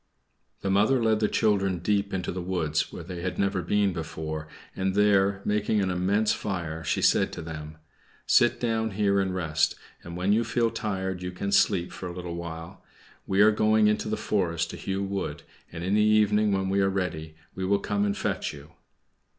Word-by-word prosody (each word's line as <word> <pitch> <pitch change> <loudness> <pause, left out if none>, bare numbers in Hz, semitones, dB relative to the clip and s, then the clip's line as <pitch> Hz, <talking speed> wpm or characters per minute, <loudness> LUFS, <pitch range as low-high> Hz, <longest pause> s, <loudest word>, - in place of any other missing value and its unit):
The 95 - -1
mother 110 +7 +3
led 110 -1 +3
the 105 - +2
children 100 -5 +1
deep 100 +3 0
into 95 -1 -2
the 90 - -4
wood, 85 -4 -2
where 85 - -8
they 90 0 -7
had 90 0 -3
never 100 -1 0
been 100 +2 +1
before, 80 -2 -5 0.3
and 95 0 -1
there, 100 -1 +3
making 105 +1 +1
an 95 -2 0
immense 100 +4 +1
fire, 85 -5 -4
she - - -1
said - - +3
to - - -6
them, 80 -1 -8 0.5
"Sit - - +4
down 110 -2 0
here 100 -1 +3
and 95 -1 -1
rest, 80 -3 +1 0.3
and 85 0 -8
when 95 +3 +2
you 115 +2 +3
feel 115 0 0
tired 95 -4 -3
you 90 0 -4
can 100 +2 -4
sleep 95 -3 +3
for 90 - -7
a 85 - -7
little 90 -1 -5
while. 85 -1 -7 0.4
We 95 +1 +3
are 110 +1 +7
going 110 0 +3
into 105 +1 0
the 110 - -1
forest 85 -5 -1
to - - -7
hew 95 0 -3
wood, 100 -1 -4 0.3
and 85 - -6
in 95 +2 0
the 105 - +4
evening, 105 0 +3
when 95 -1 0
we 100 +1 +2
are 95 - +3
ready, 80 -5 -3 0.2
we 95 - -5
will 100 +2 +2
come 100 0 -1
and 100 -1 0
fetch - - -2
you." 75 +2 -12
95 Hz, 200 wpm, -27 LUFS, 85-105 Hz, 0.5 s, are